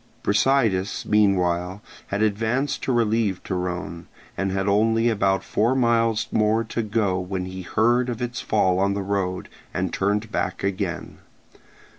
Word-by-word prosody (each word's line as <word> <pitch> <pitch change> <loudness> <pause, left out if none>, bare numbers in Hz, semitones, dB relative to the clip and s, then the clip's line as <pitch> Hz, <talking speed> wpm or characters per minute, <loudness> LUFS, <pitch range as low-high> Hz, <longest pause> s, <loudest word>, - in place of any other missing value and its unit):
Brasidas 105 -3 +1
meanwhile 95 -2 +1 0.2
had 100 +2 -1
advanced 115 +7 0
to - - -1
relieve 110 -5 +1
Torone, 90 -2 -4 0.3
and 95 0 -1
had 95 +1 -1
only 115 +3 +3
about 95 -3 +1
four 115 +5 +1
miles 115 -3 +2
more 110 +1 +2
to 115 +1 -3
go 105 -4 0
when 90 0 -3
he 95 0 -7
heard 120 +6 +1
of 120 -2 -4
its 120 -1 -3
fall 95 -4 +2
on 100 +1 +1
the 100 - -2
road, 95 -2 -2 0.3
and 95 -1 -1
turned 105 +3 0
back 95 - -2
again. 95 -3 -3
100 Hz, 145 wpm, -23 LUFS, 95-115 Hz, 0.3 s, only